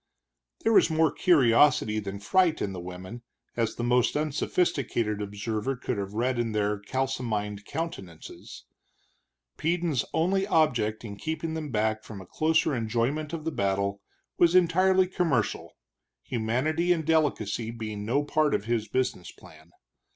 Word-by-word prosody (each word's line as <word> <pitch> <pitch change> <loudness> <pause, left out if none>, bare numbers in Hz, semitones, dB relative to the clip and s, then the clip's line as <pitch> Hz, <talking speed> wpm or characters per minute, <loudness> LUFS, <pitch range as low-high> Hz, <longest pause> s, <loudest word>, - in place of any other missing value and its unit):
There 225 - +3
was 205 - +5
more 160 -1 +3
curiosity 125 -7 +4
than 100 -1 -6
fright 170 - +2
in 100 - -2
the 90 - -6
women, 90 +6 -8 0.3
as 115 -2 -1
the 120 - -4
most 125 +3 +2
unsophisticated 140 - -1
observer 105 +5 -3
could 125 -3 -3
have 100 +1 -5
read 120 +2 0
in 115 -2 -1
their 105 -1 0
kalsomined 105 -4 -3
countenances. 100 - -7 0.9
Peden's 165 -4 0
only 190 +4 +1
object 120 - +1
in 100 -2 -7
keeping 160 +6 -4
them 160 -2 -4
back 110 -1 0
from 105 -3 -9
a 95 - -10
closer 160 - +1
enjoyment 120 +6 -1
of 160 -2 -5
the 160 - -1
battle 100 -2 -1 0.4
was 170 0 +5
entirely 185 +2 +4
commercial, 165 - -1 0.5
humanity 130 +9 0
and 165 -3 +1
delicacy 140 -9 0
being 110 -3 -5
no 130 +7 +1
part 150 0 +1
of 100 - -3
his 115 -2 -1
business 125 -8 -2
plan. 80 +1 -17
120 Hz, 145 wpm, -27 LUFS, 105-160 Hz, 0.9 s, was